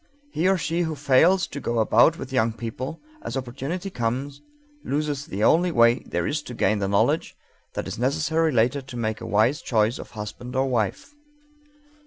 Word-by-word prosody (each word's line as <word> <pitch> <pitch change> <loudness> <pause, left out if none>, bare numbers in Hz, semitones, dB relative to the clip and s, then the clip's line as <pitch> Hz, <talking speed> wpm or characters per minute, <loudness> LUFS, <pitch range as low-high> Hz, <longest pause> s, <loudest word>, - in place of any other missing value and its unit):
He 170 - +1
or 190 - +3
she 165 +2 -1
who 160 -2 -1
fails 150 +7 +4
to 140 - -7
go 120 -3 -2
about 130 +8 +4
with 130 0 -7
young 115 -3 +2
people, 120 +6 -6 0.2
as - - -4
opportunity 140 +10 -4
comes, 130 +2 -3 0.4
loses 145 -1 -2
the 100 +3 -3
only 175 +8 +4
way 115 -3 +4
there - - -1
is 145 +1 -1
to 125 - -9
gain 105 -1 +1
the 100 - -1
knowledge 110 +11 +1 0.4
that - - -3
is - - -6
necessary 155 +5 +1
later 125 +3 +2
to 130 -2 -9
make 110 -1 -2
a - - -6
wise 110 +7 +2
choice 110 0 +1
of - - -9
husband 120 +4 -7
or 130 +1 +2
wife. 120 - -2
130 Hz, 185 wpm, -24 LUFS, 115-155 Hz, 0.4 s, fails